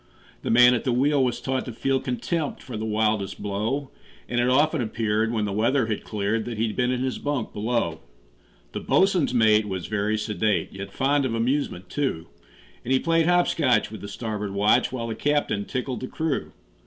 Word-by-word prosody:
The - - -4
man 125 +2 +7
at 120 - -1
the 130 - 0
wheel 135 +3 +3
was 120 -2 0
taught 130 +1 -2
to 125 - -5
feel 135 +4 0
Contempt 145 +5 -3
for 125 - -7
the 110 +1 -3
wildest 105 -2 0
blow, 110 +8 -2 0.4
And 120 - -1
it 120 +1 +2
often 150 +3 +3
appeared, 110 -1 0
when 110 -3 0
the 100 - -3
weather 115 +5 +2
had 110 -2 -3
cleared, 105 +1 -1
That 120 -2 -5
he'd 110 -1 -1
been 125 -1 +1
in 125 0 -1
his 130 -1 -2
bunk 145 -2 -2
below. 105 -7 -1 0.7
The - - -4
boatswain's 185 -7 +2
mate 110 -3 +4
was 95 -3 -4
very 105 +1 0
sedate, 105 -1 0
Yet 95 0 -7
fond 140 +4 +1
of 125 -3 -1
amusement, 115 -6 -1
too; 90 - -2 0.6
And 125 - -4
he 130 - +5
played 165 +1 +2
hop 175 0 +4
scotch 125 -10 +2
with 110 - -8
the 100 - -6
starboard 105 -1 -4
watch, 105 +5 +3
While 125 -3 -3
the 115 - -3
captain 125 -6 0
tickled 130 -1 -3
the 130 - -5
crew. 160 -1 -2
120 Hz, 200 wpm, -25 LUFS, 105-135 Hz, 0.7 s, man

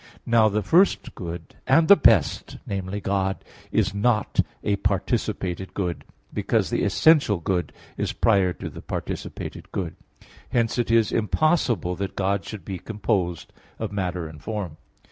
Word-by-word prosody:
Now 115 -2 +4
the 105 0 -1
first 175 - +3
good 85 -4 -7
and 160 +5 +5
the 200 - +10
best 115 - +3
viz. 100 +1 -3
God 95 -1 -1 0.3
is - - +1
not 105 +1 +1 0.2
a 100 -1 +1
participated 95 -2 -1
good, 90 -4 -2 0.3
because - - 0
the - - +1
essential 150 - +4
good 90 -1 -1 0.3
is - - -1
prior 100 -5 +3
to - - -7
the - - -9
participated - - -6
good. 90 -4 -3 0.5
Hence 115 0 +1
it 120 - 0
is 115 -2 +3
impossible 115 - +1
that 100 -1 -4
God 100 0 0
should 105 -3 -8
be 95 -3 -5
composed 95 -6 -2 0.2
of - - -4
matter 90 -4 -2
and 80 -1 -12
form. 100 -8 -4
100 Hz, 145 wpm, -24 LUFS, 90-115 Hz, 0.5 s, the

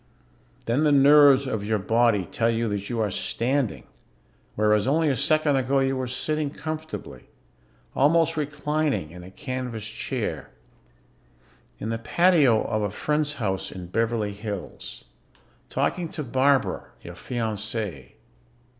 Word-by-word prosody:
Then 125 +6 +1
the 150 - +4
nerves 140 -1 +7
of 110 -6 -2
your 110 +1 0
body 110 -1 +2
tell 115 +7 0
you 115 0 0
that 100 -1 -3
you 120 -2 -2
are 105 -3 0
standing, 125 +4 -1 0.7
whereas 105 0 +2
only 155 +3 +2
a 135 - +1
second 145 +2 +2
ago 135 +1 +1
you 135 0 +2
were 130 -1 -2
sitting 150 +4 -2
comfortably, 155 +2 -7 0.7
almost 165 +3 +3
reclining, 150 - -1
in 90 +1 -10
a 90 - -10
canvas 125 -2 -5
chair. 105 - -4 1.3
In 110 - -5
the 115 0 -2
patio 150 -4 +4
of 110 -2 -1
a 105 - 0
friend's 150 +7 -1
house 95 -7 -2
in 90 -1 -8
Beverly 110 0 0
Hills. 100 - -7 0.6
Talking 175 -3 -1
to 155 - -3
Barbara, 135 +2 +1 0.2
your - - -8
fiancée. 110 - -4
125 Hz, 135 wpm, -25 LUFS, 110-145 Hz, 1.3 s, nerves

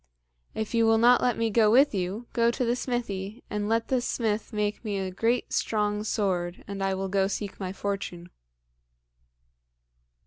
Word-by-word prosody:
"If 220 +1 -3
you 230 -1 +3
will 225 0 +5
not 240 +2 +5
let 245 -2 +1
me 230 -1 0
go 215 0 +4
with 270 +5 +5
you, 195 +4 -2
go 235 0 +3
to 245 +2 -1
the 235 +1 +1
smithy, 230 -4 -4
and 210 0 -2
let 225 0 0
the 255 -2 +2
smith 220 -3 -1
make 210 0 -2
me 210 -3 -2
a 190 -1 -3
great 230 +6 0
strong 210 -1 0
sword, 185 -5 -1
and 200 -1 -5
I 195 0 +1
will 195 0 -2
go 190 0 +1
seek 200 0 -5
my 185 -2 -3
fortune." 190 -3 -4
210 Hz, 175 wpm, -27 LUFS, 195-230 Hz, -, will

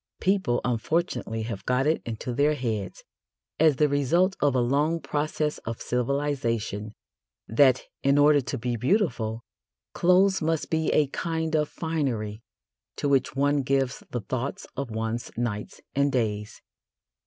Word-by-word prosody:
People 190 -11 +1
unfortunately 125 - -1
have 110 -3 -5
got 125 +2 +1
it 155 +2 +2
into 115 +2 -4
their 145 +4 +2
heads, 110 -8 -3 0.6
as 155 -2 +5
the 150 +3 +3
result 165 +7 +2
of 145 -2 +2
a - - +3
long 145 +7 +1
process 150 0 -2
of 115 0 -6
civilisation, 120 -5 -1 0.5
that, 130 +2 +4 0.2
in 140 +1 +3
order 145 0 +6
to 125 - -4
be 120 +1 -2
beautiful, 120 - 0 0.5
clothes 190 +2 +4
must 160 0 -1
be 160 -1 +1
a 150 - +4
kind 160 +1 -2
of 150 -1 +1
finery 125 -10 -2 0.5
to - - -2
which 135 -2 +2
one 140 +1 +2
gives 135 0 0
the 120 - -3
thoughts 130 - -4
of 140 -3 -3
one's 110 +1 -3
nights 110 -3 -3
and 140 0 +2
days. 105 -4 -2
135 Hz, 140 wpm, -26 LUFS, 115-150 Hz, 0.6 s, order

